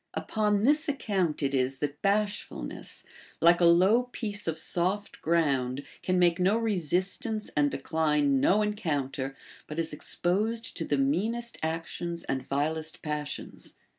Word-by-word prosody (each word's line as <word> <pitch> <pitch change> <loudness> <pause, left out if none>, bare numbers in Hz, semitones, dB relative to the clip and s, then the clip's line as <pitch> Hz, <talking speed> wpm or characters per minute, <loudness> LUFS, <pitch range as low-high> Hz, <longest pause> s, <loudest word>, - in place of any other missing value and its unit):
Upon 210 -2 0
this 300 +5 +3
account 190 - -1
it 140 0 0
is 135 0 +1
that 145 +1 -4
bashfulncss, 205 - -2 0.4
like 170 +1 +5
a - - +6
low 190 +9 +5
piece 210 -5 -4
of 160 -1 -1
soft 190 +4 0
ground, 140 -5 +1 0.2
can 185 0 0
make 175 -1 +3
no 190 +4 +3
resistance 205 +1 0
and 145 -1 +3
decline 150 -1 +1
no 205 +9 +4
encounter, 145 -10 -2 0.3
but 150 - -7
is 165 -2 -1
exposed 215 +9 -1
to 165 - -2
the 145 - 0
meanest 215 +13 0
actions 165 +1 -3
and 135 -1 -2
vilest 155 +4 -2
passions. 150 -1 -5
170 Hz, 135 wpm, -28 LUFS, 150-205 Hz, 0.4 s, a